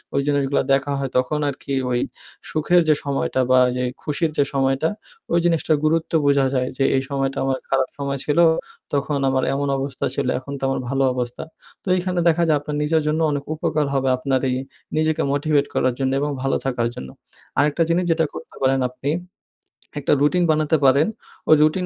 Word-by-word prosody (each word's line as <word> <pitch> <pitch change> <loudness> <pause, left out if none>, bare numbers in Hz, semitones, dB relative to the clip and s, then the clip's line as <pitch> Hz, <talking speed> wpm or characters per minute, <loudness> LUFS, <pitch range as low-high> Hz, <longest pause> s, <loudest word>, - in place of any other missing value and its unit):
ওই 140 - +3
জিনিসগুলো 140 -1 +1
দেখা 140 +1 +1
হয় 135 -1 -2
তখন 130 +4 0
আরকি 140 0 -6 0.2
ওই 120 - +1 0.5
সুখের 175 +3 +3
যে 155 - +6
সময়টা 135 -2 0
বা 130 - +6 0.2
যে 125 - -1 0.2
খুশির 155 +2 -1
যে - - +5
সময়টা 135 +3 +1 0.4
ওই 170 - +4
জিনিসটার 165 -2 +2
গুরুত্ব 160 +1 +1
বোঝা 140 -1 +4
যায় 125 -1 0
যে, 135 - +1
"এই 135 - +2
সময়টা 135 -1 -1
আমার 135 -1 0
খারাপ 135 -1 +2
সময় 140 -1 -3
ছিল 150 +2 +1 0.5
তখন 140 0 0
আমার 130 -1 +1
এমন 140 +1 -1
অবস্থা 135 0 -3
ছিল 140 -2 -1
এখন 140 +2 -8
তো - - -19
আমার 135 - -1
ভালো 135 0 +1
অবস্থা।" 125 -1 -4 0.4
তো - - -15
এইখানে 180 0 -1
দেখা 170 +1 +3
যায় 155 -2 +4
আপনার 145 +1 -5
নিজের 160 +1 +2
জন্য 155 +1 +1
অনেক 145 -1 -2
উপকার 150 -1 0
হবে 135 -1 +1
আপনার 130 0 0
এই 125 - 0 0.4
নিজেকে 155 0 +1
মোটিভেট 145 0 +1
করার 130 -1 +1
জন্য 130 -1 +1
এবং 145 - 0
ভালো 135 - +1
থাকার 120 -3 0
জন্য। 65 - -7 0.5
আরেকটা 150 +3 +2
জিনিস 175 +2 +2
যেটা 160 0 +2
করতে - - -10
পারেন 135 0 +2
আপনি 130 +3 -3 0.9
একটা 145 - +2
রুটিন 175 +5 +3
বানাতে 155 0 +2
পারেন। 140 +3 +5 0.4
ওই 155 - +9
রুটিন 155 +4 +2
140 Hz, 190 wpm, -21 LUFS, 135-155 Hz, 0.9 s, ওই